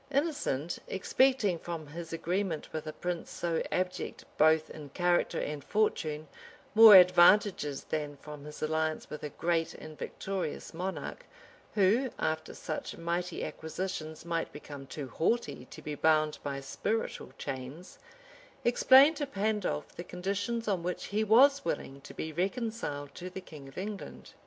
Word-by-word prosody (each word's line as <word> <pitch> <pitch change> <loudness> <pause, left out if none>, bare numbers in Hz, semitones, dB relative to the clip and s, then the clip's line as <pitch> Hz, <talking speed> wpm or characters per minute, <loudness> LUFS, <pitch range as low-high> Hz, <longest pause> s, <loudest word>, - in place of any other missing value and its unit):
[*] - - -30
Innocent, 280 - -1
expecting 210 -2 +2
from 165 -2 -5
his 165 +3 -8
agreement 175 0 -2
with 155 0 -4
a - - -2
prince 175 +1 -4
so 170 -2 -1
abject 180 0 -2
both 155 0 +4
in 150 -2 -9
character 175 +3 +1
and 150 -2 -4
fortune, 155 -8 0 0.5
more 220 -1 +11
advantages 180 -4 +6
than 150 -2 -3
from 150 0 -10
his 150 0 -8
alliance 155 0 -1
with 150 - -6
a 150 - -4
great 165 +2 -1
and 155 0 -10
victorious 190 -5 -4
monarch, 185 +3 -5 0.5
who, 215 +6 +3
after 160 0 -2
such 155 - -5
mighty 170 +1 -2
acquisitions, 160 -1 -5
might 165 -1 -2
become 145 -2 -9
too 140 -1 -6
haughty 200 - -1
to - - -11
be 150 - -4
bound 155 0 +2
by 140 -1 -3
spiritual 215 +10 -3
chains, 135 +7 -7 0.7
explained 265 +5 +7
to 290 -1 -2
Pandolf 205 - -2
the 175 - -6
conditions 200 +6 -3
on 195 -4 +1
which 180 +1 -3
he 215 +1 +2
was 275 +6 +6
willing 140 - -3
to - - -12
be 160 0 -4
reconciled 185 - -2
to 180 +1 -7
the 185 - -7
king 155 -7 -11
of 135 - -14
England. 200 +1 -6
175 Hz, 150 wpm, -31 LUFS, 155-205 Hz, 0.7 s, more